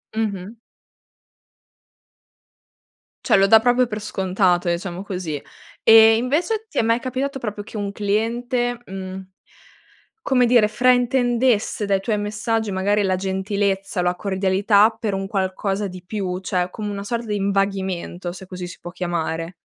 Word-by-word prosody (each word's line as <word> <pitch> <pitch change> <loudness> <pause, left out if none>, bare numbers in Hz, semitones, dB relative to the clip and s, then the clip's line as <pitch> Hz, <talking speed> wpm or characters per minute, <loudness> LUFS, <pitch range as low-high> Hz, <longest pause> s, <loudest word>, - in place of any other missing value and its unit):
Mh-mh. 210 -1 -3 2.7
Cioè, - - +4
lo 195 0 +4
dà 220 +2 +8
proprio 245 +2 +3
per 215 -1 -5
scontato, 185 -3 +1
diciamo 175 +1 -3
così. 180 -7 -4 0.4
E, 225 0 +8
invece 340 - 0
ti - - -9
è - - +5
mai 230 +1 +2
capitato 270 +2 -3
proprio 210 -3 -5
che 215 - -9
un 200 -1 -3
cliente, 235 +4 -1
mhmm, 190 -1 -7 1.0
come 250 -2 +3
dire, 235 -3 +5
fraintendesse 245 -1 +2
dai 200 -1 +1
tuoi 210 +2 -1
messaggi, 210 +1 -2
magari, 200 +2 +1
la 190 -1 +1
gentilezza, 195 0 -1
la 180 0 +1
cordialità, 200 +2 +3
per 215 -3 -2
un 195 0 -3
qualcosa 195 +1 -1
di 185 -1 -10
più, 185 -2 -3
cioè, 185 -1 -1
come 210 +1 -5
una 200 0 -5
sorta 235 +3 -3
di 210 - -1
invaghimento, 195 -3 -2
se 190 +1 -10
così 180 -1 -6
si 175 - -10
può 175 - -7
chiamare? 170 -1 -3
200 Hz, 145 wpm, -21 LUFS, 190-225 Hz, 2.7 s, dà